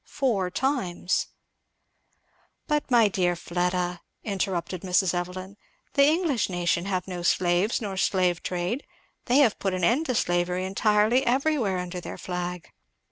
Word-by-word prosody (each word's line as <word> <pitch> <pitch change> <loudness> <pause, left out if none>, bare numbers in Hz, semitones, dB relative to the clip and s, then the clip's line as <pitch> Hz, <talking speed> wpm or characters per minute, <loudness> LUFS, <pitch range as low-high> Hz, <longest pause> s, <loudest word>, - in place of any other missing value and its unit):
Four 215 -10 0
times" 185 -7 -1 1.4
"But 300 -2 -1
my 235 -4 +5
dear 180 -3 +1
Fleda," 180 +1 -2 0.2
interrupted 185 -4 -2
Mrs. 185 -1 +2
Evelyn, 185 +2 -5 0.4
"the 280 - +5
English 310 - +1
nation 175 -1 0
have 190 -1 -2
no 180 -2 -5
slaves 180 +5 +2
nor 200 -3 -4
slave 180 -3 +1
trade 180 +9 -2 0.4
they 250 - +3
have 220 - -1
put 195 -2 -1
an 185 - -3
end 255 - +2
to 255 - 0
slavery 175 -1 0
entirely 210 +5 +2
everywhere 260 -6 +1
under 180 0 -5
their - - -7
flag." 180 -1 -5
185 Hz, 135 wpm, -26 LUFS, 180-230 Hz, 1.4 s, my